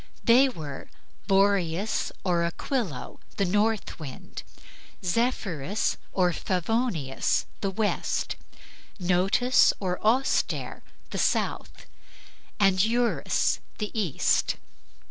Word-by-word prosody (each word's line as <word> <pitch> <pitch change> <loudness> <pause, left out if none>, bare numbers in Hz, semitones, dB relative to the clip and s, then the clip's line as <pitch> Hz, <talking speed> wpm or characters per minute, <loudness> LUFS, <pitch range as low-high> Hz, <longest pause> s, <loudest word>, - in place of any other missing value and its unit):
They 255 +4 +6
were 150 - -7 0.4
Boreas 195 -1 +2
or 175 -3 +1
Aquilo, 170 - -3 0.2
the 200 - +2
north 210 +3 0
wind; 140 -5 -8 0.6
Zephyrus 200 - 0
or 180 -2 +2
Favonius, 185 - 0
the 195 - -1
west; 205 +2 -1 0.6
Notus 190 +8 +3
or 180 -2 -2
Auster, 245 +5 +1 0.3
the - - -3
south; - - -1 0.7
and 195 -2 +4
Eurus, 235 +2 +1 0.2
the 210 -2 -3
east. 200 - +1
195 Hz, 85 wpm, -27 LUFS, 175-225 Hz, 0.7 s, They